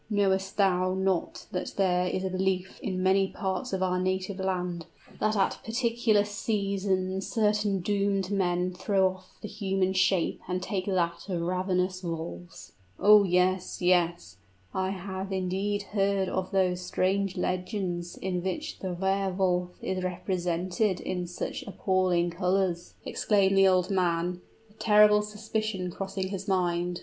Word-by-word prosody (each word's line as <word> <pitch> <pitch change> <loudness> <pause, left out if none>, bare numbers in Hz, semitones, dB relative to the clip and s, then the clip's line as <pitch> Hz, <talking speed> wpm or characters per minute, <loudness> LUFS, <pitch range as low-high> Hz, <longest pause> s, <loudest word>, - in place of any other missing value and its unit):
"Knowest 195 -2 +1
thou 185 -2 +2
not 190 -2 -1
that 180 - -4
there 180 -2 +2
is 185 +1 -2
a 190 - -1
belief 185 0 -1
in 185 -1 -2
many 190 +1 +4
parts 190 +6 -3
of 190 -1 0
our 180 0 +1
native 185 +1 -1
land 180 -3 -2 0.3
that 215 0 +1
at 195 -2 +1
particular 230 -2 +2
seasons 195 -3 -1
certain 210 -3 +1
doomed 200 0 0
men 180 -2 0
throw 190 +1 +2
off 185 0 -19
the - - -3
human 195 -2 -1
shape 185 -2 +1
and 180 +1 -2
take 190 -2 -3
that 180 -1 -1
of 180 -2 -1
ravenous 185 +1 0
wolves?" 170 0 -6 0.3
"Oh, 210 0 +7
yes 180 0 +1
yes 175 - +1 0.4
I 190 0 0
have 190 0 -5
indeed 195 +2 -1
heard 200 -2 +1
of 185 -1 -2
those 185 -2 +1
strange 190 +1 0
legends 180 -2 -2
in 180 -2 -2
which 305 - -4
the 185 -2 -3
Wehr 195 +2 0
Wolf 180 -1 0
is 185 -1 -2
represented 180 +1 -1
in 180 -1 -3
such 175 - -4
appalling 185 -3 +1
colors!" 180 -1 -1
exclaimed 195 -2 +2
the 195 0 +6
old 185 0 +2
man, 175 -1 0 0.3
a 210 - -24
terrible 210 -1 +5
suspicion 210 -3 -3
crossing 190 0 -4
his 195 +1 -5
mind. 175 -2 0
190 Hz, 145 wpm, -28 LUFS, 180-195 Hz, 0.4 s, Oh